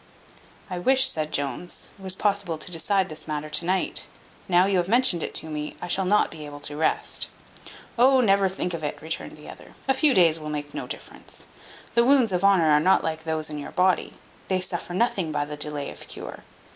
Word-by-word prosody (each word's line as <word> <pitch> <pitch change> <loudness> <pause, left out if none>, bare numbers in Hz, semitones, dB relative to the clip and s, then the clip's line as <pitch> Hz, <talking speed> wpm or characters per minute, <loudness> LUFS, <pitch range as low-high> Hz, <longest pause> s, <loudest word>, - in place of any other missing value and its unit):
"I 180 -2 -4
wish," 260 +7 +5
said 155 -5 -2
Jones, 145 +5 -3
"it 195 - -20
was 190 -1 0
possible 200 -5 0
to 155 - -6
decide 190 +3 +1
this 155 -1 -7
matter 150 0 -4
to 155 +3 0
night: 185 +1 0 0.4
now 180 0 +4
you 195 -1 +1
have 175 - -1
mentioned 230 -6 +3
it - - -4
to - - 0
me, 150 -1 -5
I - - -5
shall 190 +2 0
not 210 +3 +3
be 155 -2 -9
able 145 -1 -8
to 145 - -5
rest." 155 +1 0 0.7
"Oh, 260 +2 +6
never 200 -4 +3
think 180 -1 -3
of 165 -2 -5
it," 150 - -3
returned 160 0 -4
the 150 - -13
other: - - -12
"a 270 - +4
few 270 0 +3
days 165 -3 +5
will 155 -1 -6
make 145 -1 -5
no - - -5
difference. - - -8 0.5
The 235 - +4
wounds 255 -4 +4
of 180 0 -1
honour 185 -6 +5
are 150 - +6
not 185 +5 +3
like 160 0 -3
those 155 -1 -2
in 150 - -5
your 145 - -8
body: 185 0 +1 0.3
they 185 -1 +1
suffer 175 -1 -4
nothing 190 -6 0
by 145 -1 -1
the 150 0 -6
delay 150 -1 -4
of - - -11
cure. - - -8
175 Hz, 220 wpm, -25 LUFS, 155-195 Hz, 0.7 s, Oh